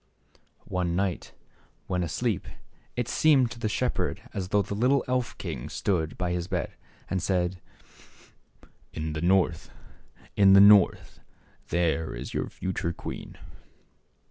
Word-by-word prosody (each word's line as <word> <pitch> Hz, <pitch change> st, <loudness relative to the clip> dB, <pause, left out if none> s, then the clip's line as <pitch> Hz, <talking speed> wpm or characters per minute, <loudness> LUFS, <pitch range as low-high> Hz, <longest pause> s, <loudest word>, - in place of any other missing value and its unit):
One 90 Hz, -2 st, -1 dB
night 95 Hz, -1 st, -2 dB, 0.5 s
when 90 Hz, -1 st, -1 dB
asleep 95 Hz, +5 st, -2 dB, 0.5 s
it 120 Hz, -1 st, -2 dB
seemed 135 Hz, -4 st, +3 dB
to 120 Hz, -, -8 dB
the 110 Hz, -, -1 dB
shep -, -, -1 dB
herd -, -, -1 dB
as 95 Hz, -2 st, -3 dB
though 100 Hz, +2 st, +2 dB
the 100 Hz, -, -5 dB
little 125 Hz, +6 st, +2 dB
elf 125 Hz, -2 st, -1 dB
king -, -, -5 dB
stood 80 Hz, -6 st, -1 dB
by 90 Hz, -1 st, -1 dB
his 90 Hz, 0 st, -2 dB
bed -, -, -3 dB, 0.3 s
and 95 Hz, -, -2 dB
said, 90 Hz, -1 st, -1 dB, 0.7 s
" -, -, -37 dB, 0.3 s
In 80 Hz, 0 st, -4 dB
the 75 Hz, -, -4 dB
North, 90 Hz, -2 st, +2 dB, 0.7 s
in 100 Hz, -1 st, +6 dB
the 100 Hz, -, +8 dB
North, 100 Hz, -2 st, +5 dB, 0.5 s
there 80 Hz, -4 st, 0 dB
is -, -, -7 dB
your -, -, -2 dB
future 90 Hz, -2 st, -3 dB
queen." -, -, -8 dB
95 Hz, 145 wpm, -27 LUFS, 85-105 Hz, 0.7 s, the